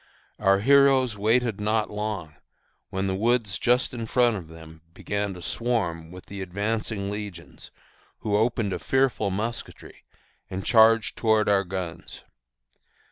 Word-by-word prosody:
Our 100 -1 +3
heroes 135 -2 +4
waited 110 +1 +1
not 110 +1 0
long, 105 -7 -4 0.6
when 95 +1 -2
the 95 - -1
woods 110 0 0
just 125 +1 +2
in 115 -2 -5
front 120 -1 +3
of 90 -5 -7
them 80 0 -13
began 100 -1 -3
to 90 - -10
swarm 85 -5 -2
with 90 +1 -11
the 100 0 -8
advancing 100 +2 -2
legions, 105 -5 -8 0.5
who 105 -2 -1
opened 110 -2 +1
a - - -3
fearful 130 -6 +1
musketry, 110 +5 -5 0.5
and 95 +1 -5
charged 115 0 +4
toward 110 -2 +2
our 100 -1 +3
guns. 90 -2 -6
105 Hz, 135 wpm, -25 LUFS, 95-115 Hz, 0.6 s, heroes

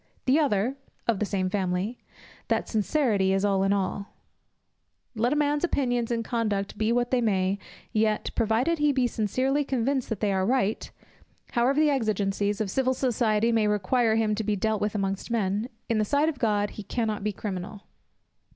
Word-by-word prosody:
The 270 +3 +4
other 255 -2 +1 0.3
(of 230 -4 +2
the 210 - 0
same 190 -2 -1
family) 190 +4 -1 0.5
that - - 0
sincerity 215 -4 +1
is 195 +1 +1
all 195 -1 +2
in 195 0 +2
all. 200 0 -2 1.0
Let 235 +3 +1
a - - +2
man's 295 0 +1
opinions 245 -8 0
and 230 -1 -1
conduct 215 -5 -1
be 215 +1 0
what 240 0 +1
they 255 -1 +2
may, 195 -3 +1 0.3
yet, 215 -1 +1
provided 235 +9 +1
he 295 0 +3
be 260 -2 +1
sincerely 255 +6 0
convinced 265 0 -1
that 225 - -3
they 205 -2 +1
are 190 0 +1
right, 225 -1 0 0.6
however 255 +4 +2
the 305 -1 +4
exigencies 205 -4 0
of 210 -3 -1
civil 260 +2 +1
society 230 -3 +1
may 220 -2 +2
require 220 +3 +2
him 220 -1 +1
to 220 +1 -2
be 210 0 0
dealt 215 +1 -1
with 210 0 -1
amongst 195 +1 -2
men, 215 0 -1 0.2
in 225 -2 +1
the - - +3
sight 285 +8 +2
of 285 -5 -6
God 205 -3 +1
he - - -8
cannot 215 -1 -2
be 210 - 0
criminal. 200 0 -6
220 Hz, 180 wpm, -26 LUFS, 200-250 Hz, 1.0 s, The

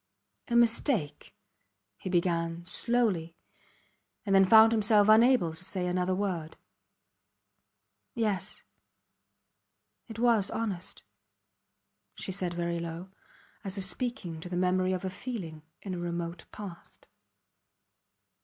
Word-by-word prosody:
A 235 - -1
mistake... 235 - +1 0.6
he - - -5
began, 170 -1 0
slowly, 185 -5 0 0.9
and 195 - 0
then 195 0 +6
found 220 +3 +7
himself 210 -2 +4
unable 220 -6 +5
to 165 +3 -8
say 185 -1 -3
another 180 +1 0
word. 180 -5 -3 1.6
Yes... 210 -6 -2 1.4
it 225 - -9
was 230 -4 +4
honest, 200 -5 -4 1.1
she 190 - -5
said 180 -2 -2
very 170 0 -2
low, 170 +2 -7 0.5
as 195 0 -4
if 195 - +2
speaking 190 -5 -2
to 175 - -8
the 175 - -3
memory 185 +1 +1
of 185 0 -3
a - - -1
feeling 185 -6 -6 0.2
in 195 - -5
a 180 - -4
remote 170 -1 -4
past. 195 -5 -11
185 Hz, 115 wpm, -29 LUFS, 170-215 Hz, 1.6 s, found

